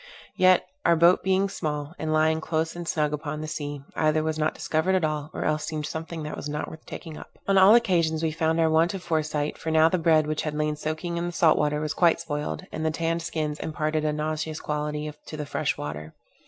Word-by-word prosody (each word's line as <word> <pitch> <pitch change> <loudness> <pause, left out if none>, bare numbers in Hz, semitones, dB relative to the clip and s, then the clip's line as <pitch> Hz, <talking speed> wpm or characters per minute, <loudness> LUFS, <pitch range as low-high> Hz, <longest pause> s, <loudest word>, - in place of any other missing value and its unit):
Yet, 185 0 +5 0.2
out 170 - +4
boat 170 +2 +5
being 190 +1 +2
small, 150 -4 -4
and 160 0 -2
lying 155 +1 +2
close 160 +1 -1
and 175 -1 -6
snug 150 -2 0
upon 150 0 -4
the 155 - -4
sea, 145 -2 -5
either 155 0 +2
was 155 0 -2
not 155 +1 0
discovered 165 +4 0
at 185 - +1
all, 150 -1 -2
or - - -4
else 155 0 0
seemed 155 -1 -3
something 160 +1 -5
that 150 - -5
was 150 - -6
not 150 0 -3
worth 160 - -11
taking 160 -3 -8
up. - - -12
On 195 - +3
all 195 +3 +8
occasions 165 -8 +2
we 160 - +1
found 160 +1 0
our 165 - +4
want 160 +4 +3
of 185 - -6
foresight, 155 -3 -1
for 160 - -4
now 160 0 +5
the 185 - 0
bread 160 -2 +4
which 155 0 -1
had 150 -1 -3
lain 150 0 0
soaking 155 +3 -3
in 170 +1 -1
the - - -3
salt 170 -2 +4
water, 150 0 +1
was 155 0 -2
quite 170 -2 +3
spoiled, 145 - -4
and 155 - -4
the 160 - +2
tanned 165 +1 -1
skins 155 -3 -3
imparted 155 0 -1
a 155 - +1
nauseous 155 +1 -3
quality 150 0 -3 0.2
to 155 - -7
the 150 - -4
fresh 140 +1 -1
water. 75 +1 -6
155 Hz, 235 wpm, -26 LUFS, 150-165 Hz, 0.2 s, all